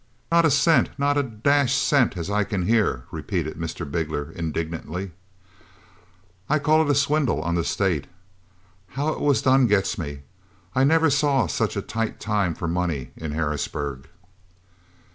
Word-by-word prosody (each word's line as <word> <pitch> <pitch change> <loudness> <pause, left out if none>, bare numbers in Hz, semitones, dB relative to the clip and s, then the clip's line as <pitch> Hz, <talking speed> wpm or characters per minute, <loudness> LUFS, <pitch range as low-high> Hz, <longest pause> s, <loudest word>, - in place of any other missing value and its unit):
"Not 170 0 +5
a - - +5
cent, 140 -1 +4
not 145 +1 +1
a 145 - +3
dash 135 +2 +1
cent, 130 -10 +2
as 85 - -4
I 105 +1 +1
can 100 -2 -2
hear," 105 - +1
repeated - - -3
Mr. - - -5
Bigler, 75 0 -3
indignantly. 85 +2 -4 1.4
"I 150 - +3
call 155 +2 +3
it 155 - 0
a 145 - +3
swindle 140 - +1
on 85 0 -1
the 85 -1 +1
state. 90 -7 0 0.9
How 145 +3 0
it - - -3
was 145 -2 +2
done 130 -1 +4
gets 105 0 +1
me. 70 -4 -5 0.5
I 130 - +2
never 160 +2 +4
saw 140 -4 +2
such - - -1
a - - -2
tight 115 -1 -3
time 100 -6 0
for 85 - -4
money 85 -6 -2
in 80 -2 -5
Harrisburg." 75 -3 -3
105 Hz, 160 wpm, -24 LUFS, -, 1.4 s, Not